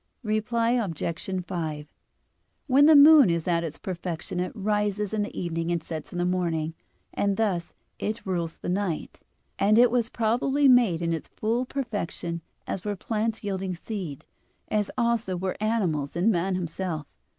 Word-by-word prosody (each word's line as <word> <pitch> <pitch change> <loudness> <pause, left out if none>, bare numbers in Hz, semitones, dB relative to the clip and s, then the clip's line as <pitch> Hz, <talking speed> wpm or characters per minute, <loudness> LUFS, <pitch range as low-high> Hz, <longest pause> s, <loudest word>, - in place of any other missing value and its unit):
Reply 230 +2 +1
Obj. 185 -4 -2
5: 155 -5 -4 0.7
When 280 +1 +5
the 315 - +8
moon 290 - +9
is 170 0 -1
at 170 -1 +2
its 160 -1 -5
perfection 175 -1 -4
it 180 0 -1
rises 210 0 -1
in 215 - +1
the 205 - -4
evening 165 -1 -2
and 170 -2 -1
sets 160 -2 -6
in - - -6
the 175 - +1
morning, 170 -3 0 0.4
and 200 -1 0
thus 190 -6 -1 0.2
it 215 +1 -3
rules 170 -4 -2
the - - -7
night, 180 -3 -2 0.4
and 210 +2 +4
it 240 0 +6
was 235 -2 +1
probably 250 +5 +2
made 235 -10 +5
in 165 0 0
its 160 - -4
full 230 +4 -1
perfection 205 -10 -3 0.2
as 185 - -4
were 205 -1 -2
plants 220 +3 -2
yielding 190 -2 -2
seed, 175 - -6 0.4
as 210 -1 0
also 235 -6 +1
were 185 +1 -2
animals 180 -11 0
and 185 +6 +3
man 185 0 0
himself. 170 -2 -3
190 Hz, 160 wpm, -26 LUFS, 170-225 Hz, 0.7 s, moon